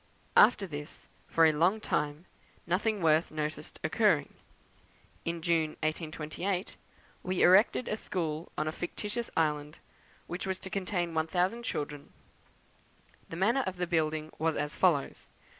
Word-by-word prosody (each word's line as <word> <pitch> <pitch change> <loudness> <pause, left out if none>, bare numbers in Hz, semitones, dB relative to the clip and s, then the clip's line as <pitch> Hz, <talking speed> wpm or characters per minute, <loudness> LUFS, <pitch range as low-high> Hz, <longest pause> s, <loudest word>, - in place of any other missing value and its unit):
After 205 -5 +6
this, 150 -3 -8 0.2
for 165 - +4
a 160 - +6
long 175 +8 +2
time, 150 -3 -2 0.4
nothing 195 +3 0
worth 160 +1 +4
noticing 155 -1 -4
occurred. 160 -3 +2 1.0
In 170 -1 -3
June, 160 -2 +1
1828, 160 +4 -2 0.5
we 185 0 0
erected 200 +6 +5
a - - 0
school 165 -6 -3
on 155 - 0
a - - 0
fictitious 210 +7 -4
island, 150 -1 0 0.5
which 175 +3 -5
was 190 -1 -1
to 190 - -8
contain 180 -3 -1
1,000 180 +8 0
children. 145 -9 -5 1.2
The - - -6
manner 225 +10 +2
of 185 -1 -4
the 180 - 0
building 155 -2 0
was 160 0 +1
as 150 +1 -2
follows. 165 -7 +1
165 Hz, 135 wpm, -30 LUFS, 155-190 Hz, 1.2 s, After